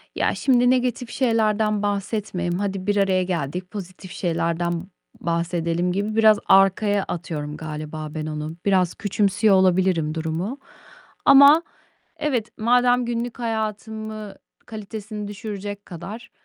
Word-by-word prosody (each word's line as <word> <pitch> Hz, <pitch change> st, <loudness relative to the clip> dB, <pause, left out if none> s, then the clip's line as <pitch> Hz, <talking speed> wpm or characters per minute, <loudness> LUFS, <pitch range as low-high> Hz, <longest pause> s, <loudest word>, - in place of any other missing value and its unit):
ya, -, -, +1 dB
şimdi 245 Hz, -2 st, +3 dB
negatif 250 Hz, -1 st, 0 dB
şeylerden 215 Hz, -4 st, +1 dB
bahsetmeyeyim, 200 Hz, -3 st, -2 dB
hadi 195 Hz, -1 st, -3 dB
bir 205 Hz, -, +2 dB
araya 190 Hz, -2 st, +2 dB
geldik, 180 Hz, +1 st, -3 dB
pozitif 185 Hz, -2 st, -8 dB
şeylerden 170 Hz, 0 st, -1 dB, 0.3 s
bahsedelim 170 Hz, +1 st, -1 dB
gibi 205 Hz, +3 st, -2 dB
biraz 220 Hz, -2 st, +5 dB
arkaya 195 Hz, +1 st, +4 dB
atıyorum 155 Hz, -4 st, -5 dB
galiba 155 Hz, 0 st, -6 dB
ben 155 Hz, -, -3 dB
onu. 155 Hz, +1 st, -5 dB
Biraz 185 Hz, -3 st, +2 dB
küçümsüyor 205 Hz, 0 st, +2 dB
olabilirim 185 Hz, -4 st, +2 dB
durumu. 165 Hz, -, -3 dB, 0.7 s
Ama 285 Hz, +4 st, +8 dB, 0.6 s
evet, 245 Hz, -7 st, -1 dB
madem 245 Hz, +2 st, +3 dB
günlük 240 Hz, +1 st, -3 dB
hayatımı 220 Hz, -2 st, -4 dB, 0.3 s
kalitesini 215 Hz, -1 st, -7 dB
düşürecek 205 Hz, -1 st, -6 dB
kadar 205 Hz, +7 st, -8 dB
200 Hz, 115 wpm, -23 LUFS, 175-220 Hz, 0.7 s, Ama